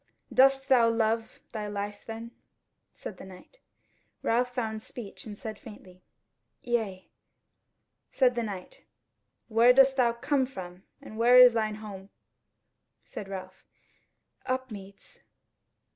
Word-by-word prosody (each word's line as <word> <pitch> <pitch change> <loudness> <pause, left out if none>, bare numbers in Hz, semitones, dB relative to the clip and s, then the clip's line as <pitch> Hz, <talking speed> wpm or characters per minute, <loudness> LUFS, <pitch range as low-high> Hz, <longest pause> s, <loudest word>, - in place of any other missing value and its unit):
"Dost 270 +1 +5
thou 240 -4 +5
love 225 0 -1
thy 210 -2 -4
life 205 0 -5
then?" 225 +1 -7 0.6
said 185 - -9
the - - -11
Knight. 190 - -14 0.6
Ralph 245 +2 +1
found 220 -3 -3
speech 220 -2 -10
and 205 -1 -8
said 215 -1 -7
faintly, 185 -4 -13 0.6
"Yea." 220 -6 -2 1.0
Said 255 -2 +3
the 240 - -1
Knight: 200 -5 -7 0.6
"Where 235 +2 +5
dost 270 +1 +5
thou 240 -2 +3
come 265 +2 0
from, 180 -7 -9 0.2
where 235 +3 +3
is 250 -1 +9
thine 215 -2 -1
home?" 200 -3 -9 1.0
Said 200 - -8
Ralph, 185 -1 -8 0.8
"Upmeads." 215 -7 -6
225 Hz, 115 wpm, -28 LUFS, 205-245 Hz, 1.0 s, is